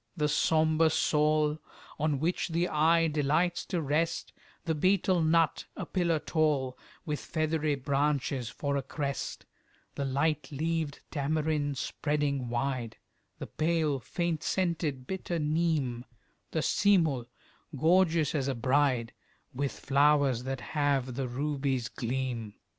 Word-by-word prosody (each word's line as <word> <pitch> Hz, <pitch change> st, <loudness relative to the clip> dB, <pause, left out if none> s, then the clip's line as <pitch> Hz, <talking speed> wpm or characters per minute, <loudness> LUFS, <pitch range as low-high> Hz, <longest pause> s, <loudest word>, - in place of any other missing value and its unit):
The 150 Hz, -, +2 dB
sombre 160 Hz, +1 st, +3 dB
saul, 150 Hz, 0 st, +2 dB, 0.4 s
On 150 Hz, -2 st, +1 dB
which 170 Hz, +5 st, 0 dB
the 170 Hz, +1 st, 0 dB
eye 165 Hz, +2 st, +3 dB
delights 155 Hz, +4 st, +1 dB
to 170 Hz, -3 st, -2 dB
rest, 160 Hz, +4 st, -1 dB, 0.3 s
The 165 Hz, -, +1 dB
betel 185 Hz, +2 st, +2 dB
nut, 160 Hz, 0 st, +2 dB
a -, -, -4 dB
pillar 170 Hz, -3 st, +1 dB
tall, 150 Hz, -4 st, 0 dB, 0.3 s
With 150 Hz, -2 st, -2 dB
feathery 155 Hz, -2 st, 0 dB
branches 140 Hz, -2 st, 0 dB
for 140 Hz, -1 st, -2 dB
a -, -, 0 dB
crest, 140 Hz, +1 st, -4 dB, 0.5 s
The 140 Hz, -, -3 dB
light 150 Hz, +4 st, 0 dB
leaved 155 Hz, 0 st, -2 dB
tamarind 150 Hz, -1 st, 0 dB
spreading 140 Hz, -2 st, -1 dB
wide, 120 Hz, -1 st, -2 dB, 0.4 s
The -, -, -6 dB
pale 155 Hz, -3 st, 0 dB
faint 170 Hz, +4 st, -2 dB
scented 165 Hz, -8 st, -1 dB
bitter 180 Hz, +1 st, -3 dB
neem, 150 Hz, -6 st, 0 dB, 0.4 s
The 160 Hz, -, -1 dB
seemul, 165 Hz, -, +2 dB, 0.5 s
gorgeous 165 Hz, -1 st, +3 dB
as 140 Hz, -3 st, 0 dB
a 135 Hz, -, -1 dB
bride, 130 Hz, -1 st, +1 dB, 0.4 s
With 140 Hz, +2 st, -1 dB
flowers 140 Hz, -3 st, +2 dB
that 135 Hz, -1 st, -3 dB
have 140 Hz, -4 st, 0 dB
the 130 Hz, +1 st, -2 dB
ruby's 135 Hz, -1 st, -1 dB
gleam. 120 Hz, -3 st, -3 dB
150 Hz, 125 wpm, -30 LUFS, 135-160 Hz, 0.5 s, sombre